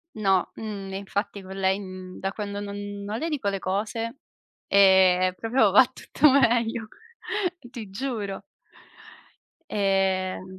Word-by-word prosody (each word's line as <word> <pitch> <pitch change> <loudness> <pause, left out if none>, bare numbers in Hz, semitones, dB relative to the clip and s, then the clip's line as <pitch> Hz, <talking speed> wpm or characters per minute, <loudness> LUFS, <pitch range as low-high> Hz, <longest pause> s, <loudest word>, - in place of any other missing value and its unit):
No, 195 -4 +2
mhmm, 200 -3 -6
infatti 200 +1 -3
con 190 0 -9
lei, 190 0 +1
mhmm, 185 -2 -9
da 195 +1 -3
quando 205 -2 -5
non 205 0 -5 0.3
non 210 +3 -3
le 330 - -2
dico 275 -10 -2
le 195 -1 -1
cose, 220 +6 -2 0.5
ehm, 190 -2 +5
proprio 225 0 +2
va 250 +7 +8
tutto 275 +4 +2
meglio, 235 -4 +2 0.8
ti 230 -6 -8
giuro. 205 -3 -4 1.3
Ehm 190 -2 0
200 Hz, 125 wpm, -25 LUFS, 190-225 Hz, 1.3 s, va